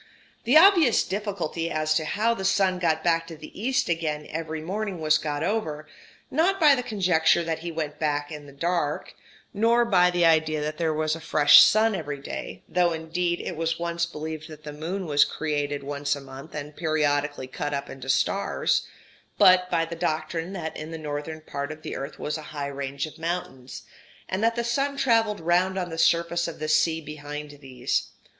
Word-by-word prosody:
The 255 +7 +6
obvious 335 - +6
difficulty 190 -5 -3
as 155 -1 0
to 155 0 0
how 220 +8 +1
the 195 - -5
sun 190 -1 +2
got 160 -3 +1
back 165 -1 +1
to 165 - -8
the 155 - -12
east 260 +3 +1
again 155 -3 -2
every 160 0 -4
morning 195 +3 -4
was 155 0 +3
got 145 -1 -3
over 155 -9 -2 0.4
not 365 +7 +2
by 300 -4 +7
the 260 - 0
conjecture 180 -7 +2
that 165 -1 -2
he 170 +1 -5
went 155 -2 -4
back 145 -1 -1
in 150 -2 -8
the - - -12
dark, 150 +1 -2 0.4
nor 230 +3 +3
by 180 -5 +4
the 175 -1 +2
idea 160 -1 +3
that 150 +1 -4
there 165 -2 +1
was 155 0 0
a - - -8
fresh 145 -1 +7
sun 220 +1 +5
every 150 -6 -4
day; 135 - -7
though, 175 -1 +2
indeed, 170 +2 -2
it 175 - -5
was 165 +1 -1
once 170 0 -1
believed 155 -1 -6
that 155 -2 -12
the 150 -1 -7
moon 175 +6 -4
was 145 -2 +4
created 145 -2 -2
once 140 0 -2
a - - -7
month, 135 +3 -11
and 150 0 -6
periodically 150 -3 0
cut 145 +3 -4
up 140 -1 -3
into 135 0 -9
stars 130 - +1 0.5
but 185 0 +6
by 165 -2 +1
the 165 +1 -7
doctrine 165 +2 -2
that 160 -4 -5
in 155 - -7
the 165 - -6
northern 155 +1 -5
part 140 -1 -5
of 155 0 -10
the - - -5
earth 135 +2 -6
was 150 +1 -3
a 155 0 -11
high 140 - -2
range 140 0 -4
of 155 - -12
mountains, 160 -7 -5 0.4
and 190 +3 -2
that 230 0 +2
the 235 - -1
sun 275 +4 -1
travelled 225 -6 +2
round 180 +3 +1
on 180 -2 -3
the 165 - -5
surface 170 0 +2
of 165 - -6
the 155 - -4
sea 160 +1 +2
behind 150 0 -7
these. 130 -2 -2
160 Hz, 200 wpm, -25 LUFS, 150-180 Hz, 0.5 s, by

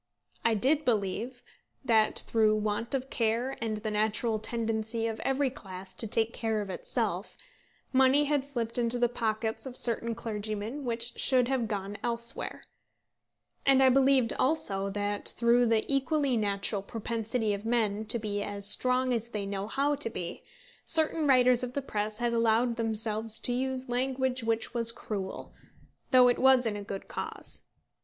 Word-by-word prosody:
I 230 -1 +3
did 280 +8 +2
believe 235 +2 -2 0.4
that 220 -3 +3
through 215 -2 +3
want 215 +4 -1
of 265 0 -4
care 235 +3 0
and 220 -1 -2
the 215 0 -4
natural 215 +1 0
tendency 225 0 -1
of 225 -1 -3
every 270 0 0
class 190 -5 -9
to 225 - -3
take 225 +1 0
care 220 -2 -1
of 200 -2 -4
itself, - - -3 0.6
money 265 +2 +5
had 290 -1 0
slipped 240 -4 -3
into 235 0 0
the 240 0 +3
pockets 225 0 -2
of 255 - -6
certain 230 -1 0
clergymen 220 +4 -5
which 235 0 -3
should 255 -2 +3
have 255 -4 0
gone 205 -1 -4
elsewhere; 235 0 -3 1.0
and 270 -1 +5
I 260 - +7
believed 265 -2 +3
also 200 -9 0
that 205 +1 -1
through 240 +1 +4
the 225 -1 +2
equally 275 0 +1
natural 200 -1 0
propensity 225 +1 -2
of 200 0 -5
men 220 -2 0
to 220 +2 +4
be 205 -2 -3
as 205 -1 +1
strong 255 +3 +2
as 230 0 -2
they 210 -3 -4
know 200 0 -4
how 280 +5 0
to 285 -5 0
be, 175 -6 -5 0.4
certain 315 -1 +5
writers 250 -2 +5
of 250 -1 -4
the 280 - -2
press 210 -3 -3
had 240 0 -1
allowed 230 +1 +2
themselves 220 -1 -1
to 245 - 0
use 260 +1 -2
language 255 0 -1
which 225 0 -1
was 230 -1 +2
cruel, 200 -5 -6 0.6
though 255 -2 +6
it 245 - +2
was 260 -1 +5
in 220 -2 -1
a 205 - -5
good 195 -1 -7
cause. - - -6
230 Hz, 165 wpm, -29 LUFS, 215-255 Hz, 1.0 s, I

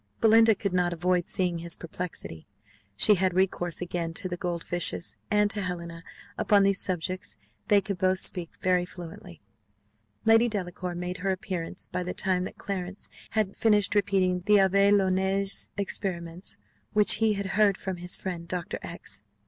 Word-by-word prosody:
Belinda 225 -1 +6
could 200 -1 -3
not 180 -1 +1
avoid 180 +1 0
seeing 180 -4 +1
his 170 0 +2
perplexity 165 - -7 0.5
she 210 - +7
had 185 -2 +1
recourse 180 -2 0
again 170 -2 -3
to 185 - 0
the 175 - -3
gold 175 -2 -3
fishes 105 - 0
and 210 0 +3
to 210 - -1
Helena: 170 -2 -5 0.4
upon 205 -1 +4
these 195 -1 +2
subjects 185 - -2 0.3
they 205 -1 +5
could 200 -2 -5
both 185 0 +2
speak 175 -3 +2
very 180 -1 +3
fluently. 175 - -10 0.8
Lady 225 +2 +5
Delacour 180 -3 -4
made 180 +1 -4
her 195 +1 -2
appearance 185 -2 -3
by - - -4
the 180 0 -4
time 185 -2 0
that - - -8
Clarence 195 -1 -5 0.3
had 205 -3 +1
finished 210 -3 +2
repeating 190 -3 +1
the 210 - +6
Abbé 200 0 +4
Nollet's 195 0 +1
experiments, 180 -3 -2 0.4
which 210 0 +5
he 220 -1 +4
had 200 -1 -3
heard 200 0 +2
from 190 -2 -5
his 180 +1 -2
friend 175 -3 -6
Doctor 175 -1 -4
X 100 - -6
185 Hz, 165 wpm, -27 LUFS, 175-200 Hz, 0.8 s, she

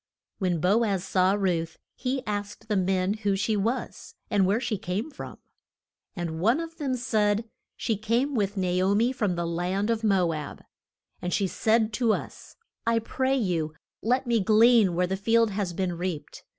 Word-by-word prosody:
When 180 -4 0
Bo 200 +8 +3
az 195 -5 0
saw 185 0 +2
Ruth 175 -5 -1 0.2
he 260 +1 -2
asked 205 0 -4
the 210 - +1
men 190 0 +1
who 200 -2 +1
she 210 +3 0
was, 225 +6 -3 0.2
and 200 -3 +3
where 205 +4 +2
she 230 -5 -2
came 200 - -3
from. 280 - -8 0.8
And 170 -3 -4
one 230 - +3
of 330 0 -6
them 270 -4 -1
said, 220 -3 +1 0.3
She 225 -3 -1
came 235 +7 0
with 205 -4 -1
Na 180 -1 +1
o 195 +2 +3
mi 235 +4 +3
from 210 -8 -1
the 170 0 -2
land 180 +5 -1
of 225 0 -1
Mo 190 -6 +3
ab. 150 -2 -6 0.6
And 180 - -3
she 200 - +1
said 220 +3 +1
to 230 -1 +2
us, - - -7 0.3
I 230 0 +3
pray 260 +4 0
you 165 -9 -1 0.3
let 250 +4 +1
me 235 -2 +2
glean 215 -2 +5
where 180 +1 +2
the 190 +2 -2
field 225 +3 +2
has 195 -2 -2
been 180 +1 -2
reaped. 175 -3 -5
205 Hz, 185 wpm, -27 LUFS, 185-230 Hz, 0.8 s, glean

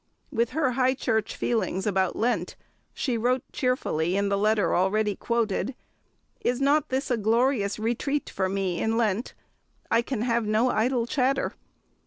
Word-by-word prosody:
With 235 +1 +1
her 275 -5 +2
High 260 +1 +2
Church 220 -5 -1
feelings 220 -5 -1
about 190 -3 +1
Lent, 220 -7 -1 0.4
she 245 -4 -2
wrote 250 +3 +1
cheerfully 195 - 0
in 200 0 +1
the 200 - +2
letter 210 0 +2
already 205 +3 +1
quoted, 235 +3 -1 0.7
"Is 245 +1 +1
not 280 +2 +2
this 265 +1 -1
a 245 - +2
glorious 225 -1 +1
retreat 240 +6 -1
for 190 -1 -1
me 190 -2 -1
in 225 0 +1
Lent? 225 0 0 0.6
I 230 - +4
can 235 -2 -3
have 235 -2 0
no 220 +4 +2
idle 240 +1 +1
chatter." 265 +1 0
230 Hz, 155 wpm, -26 LUFS, 205-255 Hz, 0.7 s, I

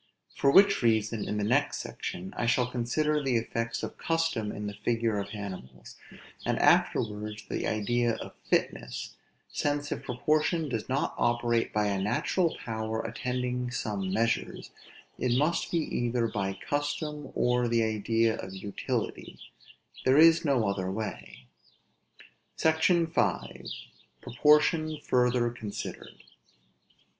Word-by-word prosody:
For 140 - +3
which 195 +7 +6
reason, 110 -2 +1
in 105 - -2
the 105 - 0
next 140 +7 +2
section, 95 +2 -6
I 120 - -1
shall 125 +1 +3
consider 150 +5 0
the 135 -3 0
effects 115 0 -3
of - - -6
custom 165 -10 0
in 105 - -5
the 105 - -4
figure 115 0 0
of 100 0 -4
animals; 65 - -8 0.5
and - - 0
afterwards 105 0 +2
the - - -2
idea 120 +2 +1
of - - -8 0.2
fitness: - - -1 0.4
since 145 0 -1
if - - -2
proportion 155 +5 0
does 115 -2 -3
not 135 +2 0
operate 120 -1 +1
by 105 0 +1
a 100 -2 0
natural 165 - 0
power 110 -1 -2
attending 125 +2 -2
some 105 -5 -3
measures, 115 +3 -1 0.5
it 125 -1 +1
must 150 +5 +1
be 170 - 0 0.2
either 120 -1 +1
by 95 -3 -2
custom, 145 0 -2
or 125 0 +2
the 115 -1 +2
idea 110 +1 +1
of 95 - -7
utility; 100 +1 -4 0.7
there 130 +2 +4
is 165 +1 +7
no 135 -8 +2
other 95 -2 -1
way. 65 - -6 1.1
SECTION 160 +2 +3
V. 95 - -1 0.5
PROPORTION 150 +4 +3
FURTHER 125 -1 +2
CONSIDERED. 110 -4 -7
120 Hz, 130 wpm, -29 LUFS, 105-140 Hz, 1.1 s, is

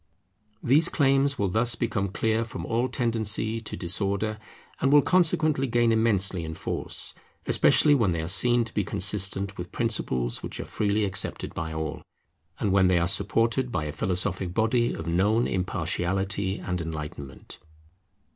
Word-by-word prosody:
These 150 +7 +4
claims 140 -1 +2
will 100 -2 0
thus 115 +4 +1
become 110 -4 -1
clear 110 +3 0
from 95 -7 -7
all 120 +5 0
tendency 115 -2 0
to 115 - -7
disorder, 100 +4 -2 0.4
and 135 - +2
will 145 -1 +6
consequently 155 -6 +2
gain 120 -1 +2
immensely 100 -5 +2
in 80 0 -6
force; - - -3 0.3
especially 150 - +4
when 115 -8 +2
they 85 -2 -1
are - - -4
seen 120 +6 +3
to 115 - -8
be 105 - 0
consistent 100 +1 -1
with 90 0 -6
principles 65 - 0
which - - -6
are - - -4
freely 105 0 0
accepted 95 -1 -2
by 80 0 -4
all, 80 -1 -4 0.6
and 105 - 0
when 95 -1 +4
they 90 -1 +3
are 85 0 +1
supported 115 +6 +1
by 75 - -2
a 75 - -4
philosophic 90 +1 -2
body 120 +2 +2
of - - -6
known 100 +8 +2
impartiality 95 +1 -1
and 90 -1 -4
enlightenment. 75 -4 -7
100 Hz, 155 wpm, -26 LUFS, 90-115 Hz, 0.6 s, will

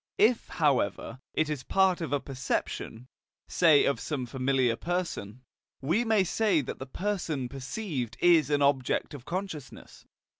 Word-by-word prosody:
If, 225 +2 +3
however, 130 -5 0 0.2
it 155 - +2
is 150 -4 -3
part 190 +3 +2
of 160 - -3
a 145 - +1
perception, 130 -3 -4 0.4
say 160 -5 +5
of 140 - +1
some 140 -5 -3
familiar 130 -1 +1
person, 130 - -4 0.4
we 170 - +1
may 220 -4 +3
say 190 -3 +2
that 130 - -6
the 130 - -6
person 170 -6 -2
perceived 130 - -5
is 170 -4 +5
an 145 -1 +2
object 140 -1 +1
of 135 -4 -9
consciousness. 175 -7 -7
145 Hz, 145 wpm, -28 LUFS, 130-180 Hz, 0.4 s, say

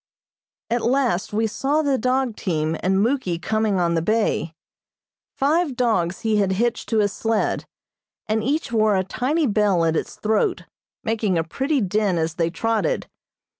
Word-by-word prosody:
At 240 0 +1
last 240 -6 +1
we 220 +2 +1
saw 275 +8 0
the 275 -3 +1
dog 255 -1 0
team 160 -5 -1
and 190 +2 +2
Muky 230 -8 0
coming 215 +1 0
on 170 -1 +1
the 165 - +1
bay. 170 -4 0 0.8
Five 300 +1 +1
dogs 205 -8 0
he 220 -1 +1
had 195 -2 +2
hitched 235 +4 -1
to 225 - +1
his 205 -1 +2
sled, 225 -1 -1 0.6
and 215 0 0
each 285 +3 -1
wore 215 -2 +3
a 190 - +1
tiny 280 - 0
bell 205 -7 +2
at 165 0 +1
its - - -3
throat, 220 - 0 0.4
making 220 -5 0
a 165 - +1
pretty 270 - -1
din 200 -1 +1
as 160 -1 -1
they 165 -1 0
trotted. 225 - -1
220 Hz, 165 wpm, -22 LUFS, 185-250 Hz, 0.8 s, wore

